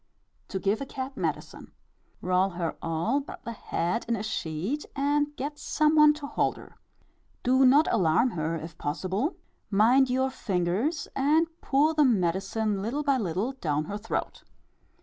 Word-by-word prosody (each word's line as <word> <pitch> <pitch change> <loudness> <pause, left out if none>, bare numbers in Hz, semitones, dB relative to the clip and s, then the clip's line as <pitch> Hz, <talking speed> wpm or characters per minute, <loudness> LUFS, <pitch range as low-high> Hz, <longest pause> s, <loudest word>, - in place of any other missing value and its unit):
To 195 - -4
give 200 +5 0
a - - -3
cat 265 +1 -6
medicine. - - -4 0.5
Roll 185 +1 +2
her 170 -2 -2
all 165 - 0
but 280 - -10
the 235 - -4
head 220 -1 -2
in 235 - +1
a 210 - -4
sheet, 190 - -3
and 290 +1 0
get 295 +2 -5
some 305 0 +2
one 300 -1 +7
to 300 -1 -7
hold - - 0
her. - - -13 0.7
Do 260 +1 +5
not 290 +5 +5
alarm 180 +9 +3
her 160 -2 -2
if 165 0 -8
possible 190 - -2 0.3
mind 240 +6 +4
your 260 +1 +1
fingers 210 - -1
and 300 +5 +3 0.2
pour 290 +4 +2
the 305 -1 +4
medicine 200 -1 +1
little 250 +9 -2
by 275 -3 +2
little 195 +4 -1
down 155 - -2
her 205 +5 -4
throat. 225 - -4
230 Hz, 160 wpm, -27 LUFS, 185-280 Hz, 0.7 s, one